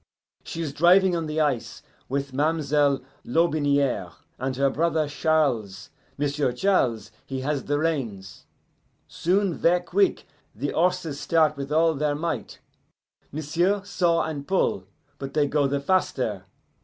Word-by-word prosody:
She 165 Hz, -, -5 dB
is 145 Hz, -3 st, -4 dB
driving 180 Hz, +4 st, +5 dB
on 165 Hz, -2 st, -2 dB
the 155 Hz, +1 st, -2 dB
ice 140 Hz, -7 st, -1 dB, 0.3 s
with 140 Hz, 0 st, -2 dB
ma'm'selle 145 Hz, -2 st, +1 dB, 0.2 s
Lotbiniere 140 Hz, -, +1 dB, 0.3 s
and 130 Hz, 0 st, -2 dB
her 135 Hz, +1 st, +2 dB
brother 160 Hz, 0 st, +1 dB
Charles. 135 Hz, -11 st, 0 dB, 0.3 s
M'sieu' 145 Hz, -2 st, 0 dB
Charles, 120 Hz, -, +1 dB
he 135 Hz, -1 st, -5 dB
has 145 Hz, +1 st, -2 dB
the 145 Hz, -, 0 dB
reins. 115 Hz, -, -3 dB, 0.6 s
Soon, 185 Hz, +1 st, 0 dB
ver' 175 Hz, +3 st, +3 dB
quick, 190 Hz, +3 st, +1 dB, 0.3 s
the 140 Hz, +7 st, -3 dB
horses 170 Hz, -4 st, 0 dB
start 155 Hz, +1 st, +2 dB
with 140 Hz, 0 st, -6 dB
all 160 Hz, +1 st, +3 dB
their 150 Hz, 0 st, 0 dB
might. 165 Hz, +2 st, -4 dB, 0.7 s
M'sieu' 170 Hz, +7 st, 0 dB
saw 175 Hz, -4 st, +1 dB
and 145 Hz, -3 st, -5 dB
pull, 185 Hz, -, 0 dB, 0.3 s
but 135 Hz, +1 st, -7 dB
they 150 Hz, -1 st, +3 dB
go 145 Hz, 0 st, +1 dB
the 140 Hz, +1 st, -1 dB
faster. 130 Hz, -, 0 dB
150 Hz, 135 wpm, -25 LUFS, 135-165 Hz, 0.7 s, driving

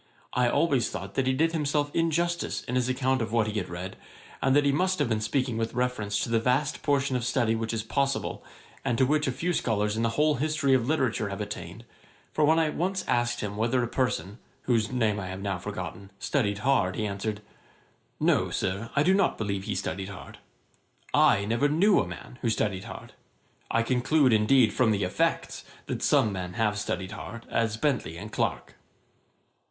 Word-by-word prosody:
I 125 Hz, -1 st, +3 dB
always 140 Hz, -4 st, +2 dB
thought 100 Hz, +1 st, -6 dB
that 130 Hz, +3 st, 0 dB
he 130 Hz, -, +3 dB
did 160 Hz, +5 st, +2 dB
himself 145 Hz, -2 st, 0 dB
injustice 170 Hz, +1 st, 0 dB
in 125 Hz, -, -5 dB
his 125 Hz, 0 st, +1 dB
account 130 Hz, 0 st, +1 dB
of 115 Hz, -1 st, -3 dB
what 115 Hz, -2 st, +2 dB
he 105 Hz, 0 st, -2 dB
had 90 Hz, -, -5 dB
read, 90 Hz, +2 st, -6 dB, 0.4 s
and 135 Hz, 0 st, +3 dB
that 145 Hz, 0 st, +4 dB
he 140 Hz, -, +4 dB
must 185 Hz, +6 st, +1 dB
have 145 Hz, -, +1 dB
been 110 Hz, -2 st, 0 dB
speaking 125 Hz, +1 st, 0 dB
with 115 Hz, +1 st, -2 dB
reference 125 Hz, -5 st, -1 dB
to -, -, -3 dB
the 115 Hz, -, +3 dB
vast 130 Hz, +5 st, 0 dB
portion 140 Hz, -2 st, +1 dB
of 125 Hz, -, -1 dB
study 120 Hz, -2 st, +1 dB
which 115 Hz, 0 st, -2 dB
is 115 Hz, -2 st, -2 dB
possible, 140 Hz, +4 st, -1 dB, 0.4 s
and 120 Hz, -, 0 dB
to 130 Hz, -, +4 dB
which 150 Hz, +2 st, +1 dB
a -, -, +1 dB
few 165 Hz, +8 st, -1 dB
scholars 105 Hz, -6 st, 0 dB
in 110 Hz, -, -1 dB
the 115 Hz, 0 st, -1 dB
whole 150 Hz, -1 st, +3 dB
history 155 Hz, -3 st, +2 dB
of 125 Hz, -2 st, +2 dB
literature 125 Hz, -8 st, 0 dB
have 100 Hz, 0 st, -5 dB
attained; 105 Hz, 0 st, -6 dB, 0.5 s
for 155 Hz, -, +2 dB
when 160 Hz, +2 st, +5 dB
I 160 Hz, -2 st, +2 dB
once 185 Hz, +4 st, -1 dB
asked 120 Hz, 0 st, +1 dB
him 105 Hz, -1 st, -4 dB
whether 120 Hz, +3 st, +1 dB
a -, -, -1 dB
person, 120 Hz, -4 st, -2 dB, 0.2 s
whose 115 Hz, -2 st, +1 dB
name 110 Hz, -5 st, +1 dB
I 95 Hz, -, -5 dB
have 95 Hz, 0 st, -6 dB
now 95 Hz, -3 st, -2 dB
forgotten, 95 Hz, 0 st, -6 dB
studied 105 Hz, -7 st, 0 dB
hard, 105 Hz, -10 st, +2 dB
he 110 Hz, -, -1 dB
answered 105 Hz, +1 st, -3 dB, 0.8 s
'No, -, -, +2 dB
Sir; 100 Hz, +5 st, -2 dB
I 145 Hz, -, +4 dB
do 185 Hz, -, +4 dB
not 195 Hz, -2 st, +2 dB
believe 100 Hz, -2 st, -2 dB
he 105 Hz, -, -2 dB
studied 95 Hz, 0 st, -3 dB
hard. 100 Hz, -, -10 dB, 0.7 s
I 100 Hz, -, +4 dB
never 115 Hz, +7 st, +1 dB
knew 185 Hz, +7 st, +4 dB
a 90 Hz, -, 0 dB
man 90 Hz, +8 st, -10 dB
who 120 Hz, -, +1 dB
studied 100 Hz, -4 st, -1 dB
hard. -, -, -9 dB, 0.6 s
I 115 Hz, -, +2 dB
conclude, 130 Hz, +2 st, +3 dB
indeed, 110 Hz, +2 st, +4 dB
from 125 Hz, -3 st, +3 dB
the 100 Hz, -2 st, +1 dB
effects, 90 Hz, -, -1 dB, 0.2 s
that -, -, -4 dB
some 135 Hz, -8 st, +3 dB
men 90 Hz, -1 st, -4 dB
have 105 Hz, 0 st, 0 dB
studied 95 Hz, -2 st, -3 dB
hard, 115 Hz, +2 st, -8 dB
as 110 Hz, -1 st, 0 dB
Bentley 125 Hz, -, -1 dB
and 105 Hz, +4 st, -8 dB
Clarke.' -, -, -2 dB
120 Hz, 200 wpm, -27 LUFS, 105-140 Hz, 0.8 s, when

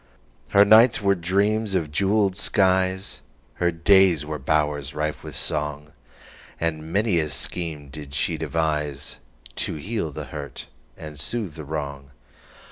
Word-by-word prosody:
Her 100 Hz, +8 st, +6 dB
nights 110 Hz, +3 st, +7 dB
were 100 Hz, -2 st, +3 dB
dreams 100 Hz, +4 st, +1 dB
of 80 Hz, -5 st, -1 dB
jeweled 100 Hz, +2 st, +2 dB
skies, 95 Hz, 0 st, +1 dB, 0.4 s
Her 85 Hz, 0 st, +3 dB
days 85 Hz, -2 st, +4 dB
were 75 Hz, 0 st, -4 dB
bowers 75 Hz, 0 st, 0 dB
rife 75 Hz, 0 st, -2 dB
with -, -, -8 dB
song, 75 Hz, 0 st, -3 dB, 0.7 s
And 80 Hz, -1 st, -2 dB
many 100 Hz, -2 st, +2 dB
a 80 Hz, -1 st, -1 dB
scheme 75 Hz, 0 st, -3 dB
did 70 Hz, 0 st, -8 dB
she 80 Hz, -, 0 dB
deviseTo 75 Hz, -5 st, -3 dB
heal 100 Hz, -2 st, -3 dB
the -, -, -6 dB
hurt -, -, -6 dB, 0.3 s
and 75 Hz, -2 st, -9 dB
soothe 105 Hz, +1 st, -2 dB
the 80 Hz, -1 st, -8 dB
wrong. 70 Hz, -2 st, -5 dB
80 Hz, 130 wpm, -24 LUFS, 75-95 Hz, 0.7 s, nights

